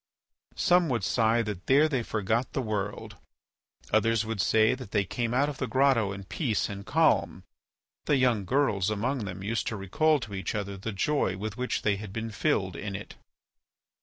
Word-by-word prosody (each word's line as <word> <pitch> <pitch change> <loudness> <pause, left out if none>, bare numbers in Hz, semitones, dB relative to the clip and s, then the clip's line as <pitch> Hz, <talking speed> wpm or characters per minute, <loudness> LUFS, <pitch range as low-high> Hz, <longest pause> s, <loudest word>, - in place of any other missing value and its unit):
Some 180 -3 +3
would 120 -6 -1
sigh 115 +2 +2
that 105 -4 -6
there 145 +4 +5
they 135 -5 -1
forgot 110 +2 -1
the 135 - 0
world; 105 -2 -4 0.8
others 110 +1 +3
would 110 -3 -2
say 110 +1 +4
that 125 -5 -7
they 100 -1 +1
came 115 +4 -2
out 135 +4 +2
of 145 -2 -5
the 130 - -1
grotto 125 -4 +3
in 100 0 -7
peace 110 - -1
and 100 -1 -6
calm; 160 +8 +2 0.6
the 145 - +3
young 125 -5 +2
girls 105 -4 +1
among 115 +3 -1
them 95 0 -6
used 115 +3 -2
to 110 - -2
recall 150 - +2
to 110 -4 -7
each 95 0 -3
other 100 -1 -3
the 100 +4 -5
joy 100 -2 0
with 105 +1 -5
which 125 +1 -2
they 105 -2 +2
had 105 -1 -8
been 115 +2 -4
filled 100 - 0
in 100 -2 -5
it. 105 - -8
110 Hz, 190 wpm, -28 LUFS, 100-130 Hz, 0.8 s, there